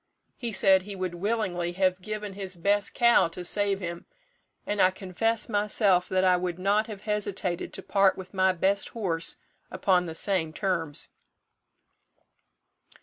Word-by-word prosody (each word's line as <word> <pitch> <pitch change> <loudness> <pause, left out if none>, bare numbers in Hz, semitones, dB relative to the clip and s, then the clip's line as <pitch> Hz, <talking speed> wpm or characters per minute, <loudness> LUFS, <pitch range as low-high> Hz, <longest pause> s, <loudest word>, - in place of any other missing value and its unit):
He 235 -2 -4
said 195 -2 +5
he 200 +1 -7
would 185 -2 -3
willingly 175 -3 -2
have 185 0 +1
given 210 0 -5
his 190 -1 -4
best 200 +3 +1
cow 235 -6 +5
to 175 +2 -8
save 200 +1 0
him; 170 -1 -6 0.6
and 205 0 0
I 185 - +6
confess 200 +4 -1
myself 205 -4 +2
that 185 0 +1
I 185 -1 +4
would 180 -1 -3
not 205 +4 +1
have 210 -3 -8
hesitated 200 -4 -2
to 195 - -5
part 195 -1 +3
with 185 0 -9
my 190 -1 +3
best 190 +3 0
horse 165 -6 -1 0.3
upon 185 -1 +1
the 160 - -6
same 165 -3 0
terms." 165 -6 -2
190 Hz, 150 wpm, -27 LUFS, 180-205 Hz, 0.6 s, I